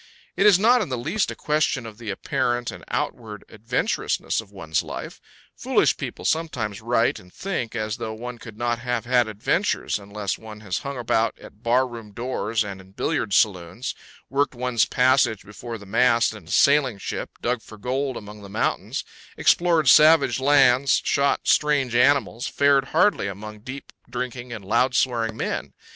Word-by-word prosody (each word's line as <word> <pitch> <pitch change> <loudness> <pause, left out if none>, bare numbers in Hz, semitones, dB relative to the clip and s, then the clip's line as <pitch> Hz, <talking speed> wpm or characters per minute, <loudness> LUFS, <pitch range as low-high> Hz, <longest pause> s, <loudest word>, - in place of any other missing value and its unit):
It - - +4
is 200 -4 +7
not 235 +5 +4
in 195 - -3
the 130 - -2
least 165 - -1
a - - -5
question 150 -4 0
of 110 -1 -10
the 115 -3 -7
apparent 120 +2 -1
and - - -11
outward 105 -3 -4
adventurousness 115 +1 -1
of 100 -3 -18
one's 80 -6 -2
life. - - -8 0.3
Foolish - - +2
people - - -7
sometimes 120 -11 -1
write 115 +1 +1
and 90 - -17
think 175 - -4
as 110 0 -2
though 115 -2 -4
one 120 +1 -7
could 115 -2 -11
not 120 0 -1
have 120 -2 -2
had 120 -1 +3
adventures 110 - -1
unless 100 -1 -4
one 110 -1 -11
has 95 -4 -3
hung 140 -1 -6
about 115 -2 0
at 105 - -15
bar 125 +3 +2
room 115 -4 -10
doors 115 -2 -1
and 100 -2 -7
in 95 0 -19
billiard 135 -3 -1
saloons, 95 +3 +1 0.3
worked 140 -1 0
one's 125 -2 +1
passage 125 -4 +2
before 115 +3 -8
the 100 - -13
mast 115 +2 +3
in 105 -6 -12
a - - -9
sailing 140 -6 +4
ship, - - -6
dug 120 -1 -1
for 110 - -13
gold 130 +4 -2
among 105 0 -10
the 100 - -11
mountains, - - -2 0.3
explored 170 -4 +3
savage 155 0 +6
lands, 135 -1 +4
shot 140 0 +2
strange 145 -5 +2
animals, 125 -1 +2
fared 140 -1 +3
hardly 170 - +2
among 105 +2 -7
deep 130 +6 -9 0.2
drinking 125 0 -5
and 110 -4 -7
loud 125 +5 +2
swearing 115 -4 0
men. - - -3
120 Hz, 175 wpm, -24 LUFS, 110-135 Hz, 0.3 s, is